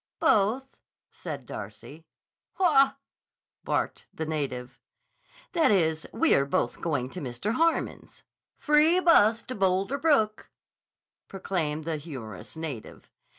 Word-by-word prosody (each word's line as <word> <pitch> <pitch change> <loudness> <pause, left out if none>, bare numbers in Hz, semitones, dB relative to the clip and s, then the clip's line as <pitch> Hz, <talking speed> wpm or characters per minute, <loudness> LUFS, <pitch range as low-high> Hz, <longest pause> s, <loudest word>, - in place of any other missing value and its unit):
"Both," 225 +7 +2 0.3
said - - -7
Darcy. - - -9 0.5
"Haw!" 275 -7 +4 0.7
barked - - -2
the 160 - -5
native. 130 -5 -4 0.7
"That 335 -3 +3
is, 160 -6 +1
we 330 - +3
are 140 0 +3
both 120 -3 -1
going 135 -6 -1
to 180 - -7
Mr. 135 - -3
Harmon's." 330 +5 -1 0.3
"Free 305 +4 +4
bus 230 - +5
to 255 - -6
Boulder 195 +5 0
Brook," 270 -9 +1 0.8
proclaimed 160 -6 -3
the 165 -2 -2
humorous 120 - -9
native. 150 -9 -7
190 Hz, 110 wpm, -27 LUFS, -, 0.8 s, bus